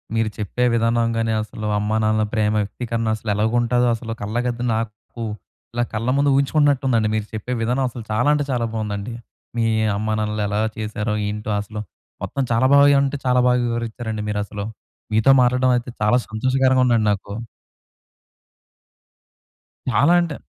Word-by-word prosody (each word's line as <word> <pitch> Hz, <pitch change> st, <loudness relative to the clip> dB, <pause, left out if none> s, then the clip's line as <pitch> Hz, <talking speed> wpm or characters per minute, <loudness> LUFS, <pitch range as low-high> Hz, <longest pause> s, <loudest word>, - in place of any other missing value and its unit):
మీరు 115 Hz, -1 st, +1 dB
చెప్పే 105 Hz, +4 st, -2 dB
విధానం 115 Hz, 0 st, +2 dB
గాని 115 Hz, 0 st, 0 dB
అసలు 110 Hz, 0 st, -7 dB
అమ్మానాన్నల 110 Hz, +1 st, +1 dB
ప్రేమ 105 Hz, -1 st, +1 dB
వ్యక్తీకరణ 115 Hz, +2 st, -3 dB
అసలు 110 Hz, 0 st, -6 dB
ఎలాగుంటుందో 120 Hz, +3 st, +2 dB
అసల 115 Hz, 0 st, -7 dB
కళ్ళకద్ది 120 Hz, +3 st, -2 dB
నాకు 110 Hz, +1 st, -5 dB, 0.5 s
ఇలా 120 Hz, 0 st, +1 dB
కళ్ళ 110 Hz, +2 st, -2 dB
ముందు 140 Hz, 0 st, +3 dB
ఊహించుకుంటున్నట్టుందండి 135 Hz, -5 st, +2 dB
మీరు 110 Hz, -1 st, -1 dB
చెప్పే 110 Hz, +3 st, -4 dB
విధానం 125 Hz, +4 st, 0 dB
అసలు 120 Hz, -1 st, -8 dB
చాలా 120 Hz, +5 st, +1 dB
అంటే 150 Hz, -1 st, +1 dB
చాలా 120 Hz, -2 st, 0 dB
బావుందండి. 105 Hz, 0 st, -3 dB, 0.4 s
మీ 115 Hz, -, +2 dB, 0.3 s
అమ్మానాన్నలు 110 Hz, 0 st, -1 dB
ఎలా 105 Hz, +1 st, -1 dB, 0.2 s
చేశారో 110 Hz, 0 st, -2 dB
ఏంటో 105 Hz, +1 st, -4 dB
అసలు, 105 Hz, +1 st, -7 dB, 0.4 s
మొత్తం 140 Hz, -, -2 dB
చాలా 115 Hz, +2 st, +3 dB
బాగా 140 Hz, 0 st, +7 dB
అంటే 140 Hz, +1 st, -1 dB
చాలా 125 Hz, 0 st, +3 dB
బాగా 125 Hz, 0 st, +3 dB
వివరించారండి 115 Hz, -2 st, -3 dB
మీరసలు. 105 Hz, 0 st, -3 dB, 0.5 s
మీతో 110 Hz, +5 st, +5 dB
మాట్లాడడం 125 Hz, +1 st, +3 dB
అయితే 120 Hz, +1 st, -5 dB
చాలా 105 Hz, +4 st, +4 dB
సంతోషకరంగా 130 Hz, +3 st, +2 dB
ఉందండి 115 Hz, -3 st, +3 dB
నాకు. 100 Hz, 0 st, -4 dB, 2.6 s
చాలా 125 Hz, +10 st, +4 dB
అంటే 165 Hz, -4 st, -3 dB
115 Hz, 140 wpm, -21 LUFS, 110-125 Hz, 2.6 s, బాగా